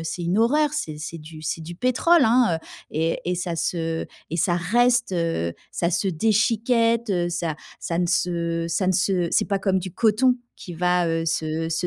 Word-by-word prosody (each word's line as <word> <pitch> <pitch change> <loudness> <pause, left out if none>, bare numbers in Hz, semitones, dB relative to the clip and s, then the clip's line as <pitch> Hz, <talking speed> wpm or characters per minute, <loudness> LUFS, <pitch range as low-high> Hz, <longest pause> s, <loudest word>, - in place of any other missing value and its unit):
c'est 160 +2 -4
une 175 +4 0
horreur, 295 +6 +3
c'est 155 - -3
c'est 165 +2 -6
du 155 0 -11
c'est 155 +2 -3
du 170 +2 -8
pétrole, 270 - +3
hein, 225 -7 +3 0.3
et 160 +2 0
et 180 - +1
ça 175 -1 -3
se 165 0 -2 0.2
et 170 - -2
ça 175 +1 +2
reste, 240 +5 +2
heu, 165 - -1 0.2
ça 170 0 0
se 175 +3 +1
déchiquette, 230 +4 +2 0.2
ça 170 -3 -2 0.3
ça 170 0 -2
ne 175 - +2
se 170 -1 0
ça 185 +3 0
ne 185 - +3
se 180 -1 +1
c'est - - +3
pas 200 -1 0
comme 190 -1 +1
du 185 -1 -6
coton 240 +3 +3 0.2
qui 175 - -9
va, 180 0 +1
heu, 165 0 -1
se 160 0 -1
se 165 +2 0
180 Hz, 190 wpm, -23 LUFS, 165-220 Hz, 0.3 s, horreur